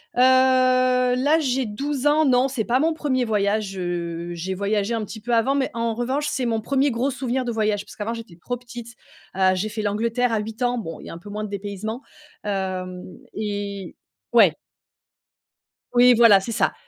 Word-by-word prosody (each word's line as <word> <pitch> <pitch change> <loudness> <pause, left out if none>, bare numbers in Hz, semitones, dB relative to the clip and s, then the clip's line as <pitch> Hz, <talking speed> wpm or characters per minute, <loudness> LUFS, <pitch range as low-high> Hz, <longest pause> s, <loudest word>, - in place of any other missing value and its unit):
Heu, 245 - +3 0.9
là, 290 +5 +3
j'ai 265 -3 0
12 275 +6 -3
ans, 300 +1 +4
non 255 -1 +4
c'est 255 -4 -2
pas 245 +2 +2
mon 320 +3 +2
1er 260 -5 0
voyage, 205 -2 0
heu, 170 -1 -3
j'ai 180 +3 -4
voyagé 200 +3 -1
un 225 -1 -1
petit 220 +2 -8
peu 240 +3 -3
avant 235 +4 +2
mais 275 -2 0
en 230 -1 -1
revanche, 260 +5 -1
c'est 260 - -2
mon 225 -2 0
1er 275 +4 +1
gros 245 +4 0
souvenir 260 -1 -2
de 240 - -2
voyage 215 -2 0
parce - - -14
qu'avant, 220 +2 -3
j'étais 230 -7 -9
trop 210 +9 -4
petite. 240 -1 -10 0.4
Heu, 190 0 +3
j'ai 200 +4 -2
fait 215 +1 -4
l'Angleterre 230 +4 0
à 220 - +1
8 220 +3 -7
ans. 245 0 +1
Bon 165 -8 -6
il - - -12
y - - -8
a - - -7
un - - -8
peu 175 +5 -12
moins 210 +1 -4
de 210 - -5
dépaysement. 205 +4 -5 0.4
Hem, 185 -2 -3 0.3
et 200 -3 -4 0.4
ouais! 215 -8 +6 1.4
Oui, 245 0 +6
voilà, 225 -4 +7
c'est 195 +4 -6
ça. 230 - +1
225 Hz, 200 wpm, -23 LUFS, 200-250 Hz, 1.4 s, voilà